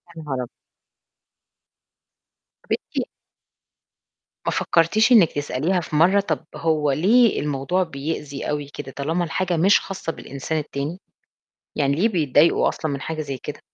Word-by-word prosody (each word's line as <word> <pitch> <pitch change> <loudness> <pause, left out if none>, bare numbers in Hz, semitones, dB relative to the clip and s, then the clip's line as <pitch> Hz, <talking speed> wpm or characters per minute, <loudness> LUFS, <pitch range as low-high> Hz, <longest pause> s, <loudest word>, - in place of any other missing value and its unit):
يا 160 - -8
نهار 130 -4 -3
أب 120 - -9 2.2
طب - - -18
أنتِ - - -2 1.4
ما - - +1
فكرتيش 215 +9 +2
إنِك 205 -10 +7
تسأليها 150 +5 -1
في 155 - -6
مرّة 185 +6 +5
طب 165 -7 -2
هو 155 -3 +1
ليه 220 - +4
الموضوع 150 +6 0
بيأذي 145 -2 -5
أوي 145 -1 -2
كده 145 -2 -7
طالما 160 +6 -1
الحاجة 175 +1 -1
مش 195 +5 +5
خاصة 190 -4 -5
بالإنسان 140 +1 -5
التاني؟ 150 +3 -4 0.8
يعني 140 -1 +2
ليه 210 +7 +3
بيتضايقوا 160 - +3
أصلًا 155 -3 -3
من 140 - -4
حاجة 160 +1 -4
زي 140 -2 -5
كده؟ 150 - -7
155 Hz, 140 wpm, -22 LUFS, 145-180 Hz, 2.2 s, إنِك